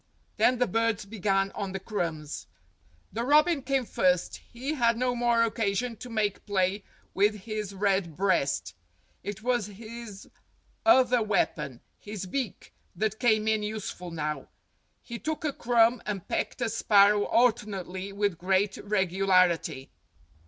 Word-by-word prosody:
Then 250 Hz, -, +4 dB
the 250 Hz, -, +3 dB
birds 225 Hz, 0 st, 0 dB
began 195 Hz, -2 st, 0 dB
on 195 Hz, -2 st, -5 dB
the 195 Hz, -, -3 dB
crumbs. 165 Hz, -7 st, -4 dB, 0.7 s
The 230 Hz, -, -2 dB
robin 300 Hz, +3 st, +4 dB
came 265 Hz, -1 st, 0 dB
first; 180 Hz, -4 st, +1 dB
he 260 Hz, +6 st, -6 dB
had 235 Hz, -5 st, +2 dB
no 250 Hz, 0 st, 0 dB
more 235 Hz, -1 st, +3 dB
occasion 225 Hz, +1 st, -1 dB
to 250 Hz, -, -9 dB
make 215 Hz, -3 st, -1 dB
play 195 Hz, 0 st, 0 dB, 0.3 s
with 205 Hz, +1 st, +2 dB
his 210 Hz, -2 st, -5 dB
red 190 Hz, -4 st, 0 dB
breast; 140 Hz, -, +1 dB, 0.5 s
it 205 Hz, +1 st, -6 dB
was 240 Hz, -4 st, +1 dB
his 215 Hz, 0 st, -10 dB, 0.6 s
other 255 Hz, -6 st, +5 dB
weapon, 150 Hz, -, -1 dB, 0.2 s
his 205 Hz, -2 st, -6 dB
beak, 235 Hz, +2 st, -4 dB, 0.2 s
that 215 Hz, +3 st, -1 dB
came 220 Hz, -3 st, +3 dB
in 220 Hz, -1 st, +2 dB
useful 210 Hz, -4 st, -5 dB
now. 150 Hz, -2 st, -4 dB, 0.6 s
He 235 Hz, -1 st, -7 dB
took 315 Hz, 0 st, -3 dB
a 295 Hz, -, 0 dB
crumb 235 Hz, -1 st, +3 dB
and 200 Hz, -4 st, -4 dB
pecked -, -, -2 dB
a 235 Hz, -, +1 dB
sparrow 205 Hz, -2 st, +4 dB
alternately 200 Hz, -5 st, 0 dB
with 200 Hz, -4 st, -1 dB
great 190 Hz, +2 st, +1 dB
regularity. 185 Hz, -7 st, +1 dB
210 Hz, 140 wpm, -28 LUFS, 190-235 Hz, 0.7 s, other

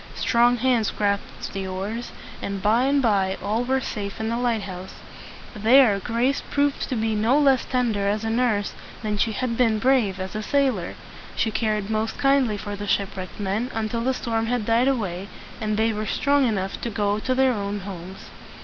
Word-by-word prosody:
Strong 240 Hz, +1 st, +3 dB
hands 240 Hz, -3 st, +2 dB
grasped 200 Hz, -1 st, -2 dB
the 195 Hz, -1 st, -3 dB
oars, 200 Hz, +6 st, -4 dB, 0.3 s
and 200 Hz, 0 st, -3 dB
by 220 Hz, +6 st, +3 dB
and 280 Hz, 0 st, +2 dB
by 195 Hz, -4 st, +2 dB
all 215 Hz, +4 st, -1 dB
were 265 Hz, +2 st, +1 dB
safe 205 Hz, -5 st, -5 dB
in 220 Hz, 0 st, -2 dB
the 235 Hz, +1 st, -1 dB
lighthouse. 200 Hz, -7 st, -3 dB, 0.6 s
There 220 Hz, 0 st, +5 dB
Grace 240 Hz, +6 st, 0 dB
proved 285 Hz, 0 st, 0 dB
to 260 Hz, -, -1 dB
be 220 Hz, -1 st, 0 dB
no 220 Hz, +6 st, +3 dB
less 275 Hz, -4 st, +4 dB
tender 230 Hz, -6 st, 0 dB
as 210 Hz, +2 st, 0 dB
a 225 Hz, -, -1 dB
nurse 225 Hz, -4 st, +1 dB, 0.3 s
than 210 Hz, -1 st, -1 dB
she 225 Hz, -, +2 dB
had 230 Hz, +2 st, -2 dB
been 230 Hz, -3 st, +3 dB
brave 220 Hz, -5 st, +2 dB
as 190 Hz, +2 st, -5 dB
a 215 Hz, -, -2 dB
sailor. 255 Hz, -7 st, 0 dB, 0.4 s
She 220 Hz, -, 0 dB
cared 215 Hz, -2 st, -1 dB
most 220 Hz, 0 st, -1 dB
kindly 275 Hz, -6 st, +2 dB
for 205 Hz, 0 st, -5 dB
the 205 Hz, 0 st, -6 dB
ship 200 Hz, -1 st, 0 dB
wrecked 185 Hz, +1 st, -7 dB
men 205 Hz, +5 st, -1 dB
until 225 Hz, +1 st, -1 dB
the 260 Hz, +2 st, 0 dB
storm 225 Hz, -2 st, -1 dB
had 240 Hz, -2 st, -1 dB
died 235 Hz, +3 st, +3 dB
away 200 Hz, -8 st, -1 dB, 0.3 s
and 215 Hz, -1 st, -1 dB
they 225 Hz, +1 st, +2 dB
were 215 Hz, 0 st, -3 dB
strong 285 Hz, -2 st, +2 dB
enough 195 Hz, -3 st, -2 dB
to 235 Hz, -, -2 dB
go 205 Hz, -1 st, 0 dB
to 255 Hz, +4 st, -1 dB
their 260 Hz, -1 st, +3 dB
own 205 Hz, -1 st, -3 dB
homes. 190 Hz, -1 st, -8 dB
220 Hz, 195 wpm, -24 LUFS, 200-245 Hz, 0.6 s, There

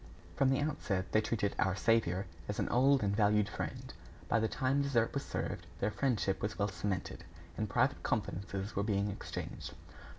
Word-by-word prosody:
From 135 Hz, -, +3 dB
the 135 Hz, +1 st, +2 dB
outset, 100 Hz, -, -1 dB
they 110 Hz, -, +4 dB
treated 105 Hz, -2 st, -1 dB
"our 95 Hz, 0 st, +2 dB
saviour" 100 Hz, -3 st, +2 dB, 0.2 s
as 105 Hz, -, -2 dB
an -, -, 0 dB
old 135 Hz, +1 st, +4 dB
and 100 Hz, 0 st, +1 dB
valued 105 Hz, -1 st, +4 dB
friend. -, -, -5 dB, 0.3 s
By 115 Hz, -, +3 dB
the 110 Hz, -, +2 dB
time 135 Hz, +2 st, +1 dB
dessert 125 Hz, -5 st, +2 dB
was 140 Hz, -, -1 dB
served, -, -, -4 dB
their 105 Hz, -, +1 dB
friendship 105 Hz, -7 st, 0 dB
was 105 Hz, +1 st, -2 dB
well 100 Hz, +1 st, +1 dB
cemented, 95 Hz, -1 st, -3 dB, 0.3 s
and 105 Hz, -1 st, -2 dB
private -, -, +2 dB
confidences 95 Hz, +2 st, -2 dB
were 100 Hz, -, +1 dB
being 100 Hz, 0 st, +1 dB
exchanged. -, -, -6 dB
105 Hz, 175 wpm, -34 LUFS, 100-120 Hz, 0.3 s, they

